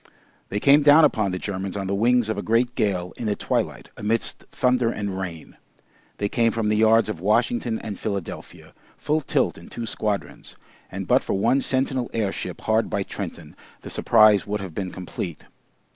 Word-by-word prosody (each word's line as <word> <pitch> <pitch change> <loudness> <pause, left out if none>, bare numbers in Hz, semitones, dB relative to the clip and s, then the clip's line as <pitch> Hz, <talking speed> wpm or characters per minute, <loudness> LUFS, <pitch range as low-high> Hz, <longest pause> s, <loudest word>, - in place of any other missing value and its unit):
They 105 - -2
came 140 +5 +5
down 150 +2 +7
upon 110 -8 +1
the 90 - -2
Germans 95 0 -4
on 100 - -3
the 95 - -2
wings 120 +3 +3
of 110 - -1
a 100 - -3
great 120 +3 +1
gale 90 -6 -1
in 115 - -4
the 105 - 0
twilight, - - -2
amidst 110 +2 0
thunder 125 -2 +2
and 100 -4 -3
rain. 85 -4 -7 0.6
They 100 - -1
came 115 +2 +2
from 110 -2 -1
the 105 - +2
yards 110 +1 +4
of 105 -6 -4
Washington 115 +3 +1
and 105 -3 -7
Philadelphia, 100 -5 -6 0.2
full 155 +1 0
tilt 135 - 0
in - - -14
two 115 - -5
squadrons, 105 -2 -4 0.4
and - - -5
but - - +4
for - - -3
one 130 +8 +2
sentinel 130 -2 +1
airship 105 -4 -3
hard 110 0 +1
by 100 - -1
Trenton, - - -7 0.3
the - - -9
surprise 110 -3 +4
would 105 +1 -2
have 95 -4 -7
been 95 +2 -3
complete. 90 -2 -6
110 Hz, 185 wpm, -23 LUFS, 100-120 Hz, 0.6 s, down